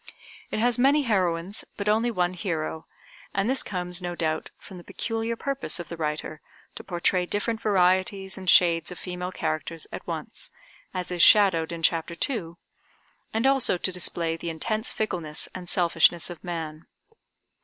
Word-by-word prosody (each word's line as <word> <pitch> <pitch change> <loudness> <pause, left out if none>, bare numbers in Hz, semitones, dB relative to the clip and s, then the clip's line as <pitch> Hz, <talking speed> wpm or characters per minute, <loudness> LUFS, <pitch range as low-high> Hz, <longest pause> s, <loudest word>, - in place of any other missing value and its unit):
It - - -3
has 240 +2 +2
many 280 +3 +5
heroines, 185 -4 0
but 200 - -3
only 220 +3 +3
one 180 -5 0
hero, 160 -3 -3 0.5
and 195 +2 +2
this 265 +2 +2
comes 180 -1 -4
no 175 -1 -3
doubt 160 -2 -1
from 185 -2 -11
the - - -12
peculiar 225 +3 -3
purpose 275 -4 -3
of 170 - -7
the 170 - -5
writer 155 -1 -3 0.3
to - - -9
portray 180 0 +1
different 220 +3 -1
varieties 190 -1 +2
and 185 -1 -3
shades 170 -2 +5
of 180 - -7
female 180 0 -4
characters 160 0 -3
at - - -7
once, - - -4 0.4
as 180 -1 -3
is 175 -1 0
shadowed 185 -7 +6
in 165 -1 -6
Chapter 165 +1 +1
II, 205 - -4 0.8
and 225 +3 0
also 270 -8 +4
to 185 - 0
display 170 -2 -1
the 170 +1 -5
intense 215 +8 -2
fickleness 170 -8 -3
and 180 -1 -7
selfishness 170 -1 +3
of 175 - -10
man. 160 -3 -5
180 Hz, 165 wpm, -26 LUFS, 165-210 Hz, 0.8 s, shadowed